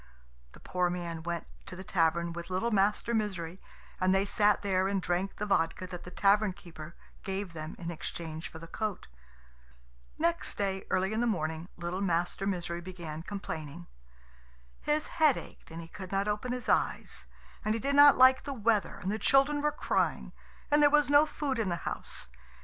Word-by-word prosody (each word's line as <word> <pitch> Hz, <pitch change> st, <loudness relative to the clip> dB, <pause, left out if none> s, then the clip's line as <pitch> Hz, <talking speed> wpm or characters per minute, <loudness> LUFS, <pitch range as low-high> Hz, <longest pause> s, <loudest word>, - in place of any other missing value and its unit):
The -, -, -14 dB
poor 180 Hz, -1 st, 0 dB
man 170 Hz, -2 st, -4 dB
went 170 Hz, 0 st, -3 dB, 0.2 s
to -, -, -7 dB
the 190 Hz, -, -8 dB
tavern 170 Hz, -1 st, +1 dB
with 170 Hz, +1 st, -7 dB
little 190 Hz, +6 st, 0 dB
Master 210 Hz, +3 st, +2 dB
Misery, 190 Hz, -5 st, -2 dB, 0.4 s
and 185 Hz, +1 st, +3 dB
they 195 Hz, +1 st, +2 dB
sat 210 Hz, 0 st, +2 dB
there 190 Hz, -1 st, +2 dB
and 195 Hz, 0 st, 0 dB
drank 180 Hz, +2 st, -1 dB
the 210 Hz, -, -3 dB
vodka 185 Hz, -2 st, +1 dB
that 175 Hz, -1 st, -8 dB
the -, -, -7 dB
tavern 200 Hz, +2 st, +3 dB
keeper 165 Hz, -2 st, -11 dB, 0.3 s
gave 195 Hz, -2 st, -4 dB
them 155 Hz, 0 st, -6 dB
in 170 Hz, -1 st, -5 dB
exchange 160 Hz, -1 st, -6 dB
for -, -, -10 dB
the 165 Hz, -, -9 dB
coat. 210 Hz, +3 st, -4 dB, 1.1 s
Next 335 Hz, +1 st, 0 dB
day, 195 Hz, -1 st, -1 dB
early 190 Hz, +3 st, +1 dB
in 220 Hz, -, 0 dB
the 240 Hz, -, +2 dB
morning, 160 Hz, -4 st, -2 dB
little 175 Hz, +2 st, -3 dB
Master 175 Hz, +1 st, 0 dB
Misery 175 Hz, -3 st, -2 dB
began 170 Hz, -4 st, -7 dB
complaining. 160 Hz, -, -6 dB, 1.0 s
His 300 Hz, +1 st, 0 dB
head 310 Hz, -5 st, +3 dB
ached -, -, -11 dB
and 165 Hz, +1 st, -8 dB
he -, -, -11 dB
could 185 Hz, +2 st, -9 dB
not 195 Hz, +1 st, 0 dB
open 210 Hz, +4 st, -1 dB
his 250 Hz, 0 st, -4 dB
eyes, -, -, 0 dB, 0.4 s
and 215 Hz, 0 st, +1 dB
he -, -, -2 dB
did 280 Hz, +5 st, -1 dB
not 285 Hz, 0 st, +8 dB
like 260 Hz, 0 st, +6 dB
the 280 Hz, -, -4 dB
weather, 220 Hz, -4 st, +1 dB
and 190 Hz, -, -1 dB
the 215 Hz, -, -2 dB
children 280 Hz, +4 st, +3 dB
were 300 Hz, 0 st, +2 dB
crying, 300 Hz, -, -1 dB, 0.4 s
and 295 Hz, 0 st, +5 dB
there 290 Hz, -, +7 dB
was 295 Hz, -1 st, +3 dB
no 290 Hz, +1 st, +7 dB
food 280 Hz, -5 st, -2 dB
in 215 Hz, -4 st, 0 dB
the 175 Hz, -, 0 dB
house. -, -, -6 dB
190 Hz, 190 wpm, -30 LUFS, 170-220 Hz, 1.1 s, not